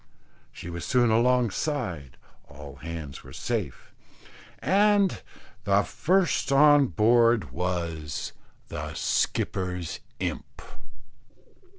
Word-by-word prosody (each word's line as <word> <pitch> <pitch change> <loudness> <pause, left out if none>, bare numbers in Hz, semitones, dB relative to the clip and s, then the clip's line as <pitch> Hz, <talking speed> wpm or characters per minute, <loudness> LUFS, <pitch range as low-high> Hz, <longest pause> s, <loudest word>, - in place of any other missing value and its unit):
She 85 - -9
was 85 0 -6
soon 120 -2 +2
alongside, 115 - 0 0.3
all 70 -1 -11
hands 80 -1 -7
were - - -13
safe, - - -4 0.6
and 200 -1 +2 0.4
the 100 +1 +3
first 180 -3 +1
on 145 0 +6
board 115 - +3
was 85 -3 -3 0.4
the - - -6
skipper's 90 -3 -1 0.2
imp. - - -5
100 Hz, 85 wpm, -26 LUFS, 85-135 Hz, 0.6 s, on